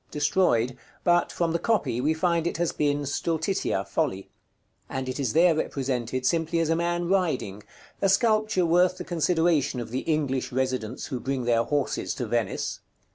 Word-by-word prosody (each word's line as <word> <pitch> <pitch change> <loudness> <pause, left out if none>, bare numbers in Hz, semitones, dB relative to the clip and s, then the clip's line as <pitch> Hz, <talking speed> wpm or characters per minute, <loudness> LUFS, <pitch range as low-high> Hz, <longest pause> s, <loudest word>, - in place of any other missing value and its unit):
_ - - -36
Destroyed; 145 -6 +2 0.3
but, 175 0 +3
from 170 -1 0
the 170 - 0
copy, 155 - 0
we 155 +4 +1
find 170 0 +1
it - - -2
has 175 0 0
been 145 -1 0
Stultitia, 160 - -1
Folly; 95 +1 -2 0.6
and 130 0 -4
it 130 +2 -4
is 130 -5 -1
there 170 +1 +5
represented 130 -4 -2
simply 165 +3 +1
as 165 -1 +1
a 165 - +3
man 175 +1 -1
riding, 155 - 0 0.4
a 195 - +3
sculpture 215 -2 +2
worth 180 +2 +3
the - - -5
consideration 165 -5 +1
of 120 - -6
the 130 - -1
English 135 -5 -1
residents 130 -2 -2
who 130 - -4
bring 135 0 -2
their 115 -1 +2
horses 145 -2 -1
to 125 - -3
Venice. 115 -3 -2
150 Hz, 175 wpm, -26 LUFS, 130-175 Hz, 0.6 s, there